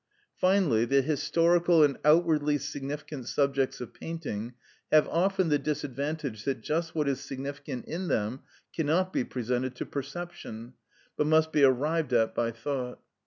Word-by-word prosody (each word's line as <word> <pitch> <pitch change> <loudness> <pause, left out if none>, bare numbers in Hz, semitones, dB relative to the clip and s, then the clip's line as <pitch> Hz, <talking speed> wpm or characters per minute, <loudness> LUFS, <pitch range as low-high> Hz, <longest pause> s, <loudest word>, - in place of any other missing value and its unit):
Finally, 185 - +3
the 135 +2 +3
historical 170 +3 +3
and 140 -2 +3
outwardly 150 -1 +4
significant 145 -1 -6
subjects 135 -1 0
of 125 - -7
painting 125 -9 -5 0.4
have 155 -1 +6
often 185 +1 +1
the 145 -1 +3
disadvantage 145 -5 -3
that 135 -3 -1
just 160 +5 -2
what 150 -2 +1
is 135 -2 0
significant 135 -1 -6
in 180 +3 -4
them 115 -2 -1 0.4
cannot 170 +4 +1
be - - +1
presented 125 +1 -2
to - - -4
perception, 140 -5 -7 0.4
but 150 - +1
must 160 0 +4
be 150 -2 +3
arrived 140 +2 +2
at 115 -2 +3
by 115 - 0
thought. 125 +2 -4
145 Hz, 145 wpm, -28 LUFS, 130-160 Hz, 0.4 s, have